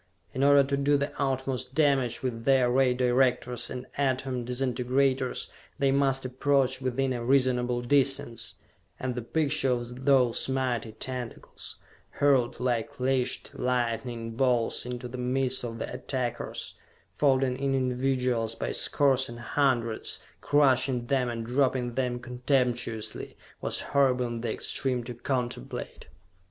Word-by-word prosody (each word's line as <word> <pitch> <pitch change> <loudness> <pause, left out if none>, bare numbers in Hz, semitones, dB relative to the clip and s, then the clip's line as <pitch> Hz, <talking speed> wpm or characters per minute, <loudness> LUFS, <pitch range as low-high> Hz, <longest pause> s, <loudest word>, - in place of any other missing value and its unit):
In 130 - -1
order 140 0 +7
to 140 +1 -1
do 145 +1 +3
the 140 +1 -2
utmost 130 -1 -2
damage 140 -6 +2
with 115 -3 -3
their 130 -1 +4
Ray 130 0 +4
Directors 125 -1 +2
and 125 -1 -6
Atom 130 -2 0
Disintegrators, 130 +1 0 0.3
they 140 -1 +2
must 135 -1 +2
approach 130 0 +1
within 130 +1 0
a 120 -1 -4
reasonable 125 -1 +2
distance 135 -2 +1 0.4
and 130 -1 -2
the 125 - -4
picture 140 +2 0
of 125 +2 -5
those 130 -3 +3
mighty 125 -4 -1
tentacles, 125 0 -6 0.4
hurled 130 -4 +2
like 120 -2 -1
leashed 130 0 +1
lightning 120 -2 -2
bolts 120 -1 +1
into 125 0 -5
the 125 +1 -7
midst 130 +1 0
of 115 -1 -5
the - - -5
attackers, 125 -1 -3 0.4
folding 135 -3 +2
in 135 0 +1
individuals 125 -3 0
by - - -3
scores 135 -3 +2
and 120 0 -8
hundreds, 120 -4 0 0.2
crushing 130 -3 +3
them 130 -1 +1
and 115 -1 -4
dropping 125 -1 +1
them 125 -1 -1
contemptuously, 125 -2 -2 0.2
was - - -1
horrible 130 -3 +2
in 120 -1 -4
the 115 -2 -2
extreme 125 +1 -1
to 120 +1 -6
contemplate! 120 - -4
125 Hz, 135 wpm, -28 LUFS, 120-135 Hz, 0.4 s, order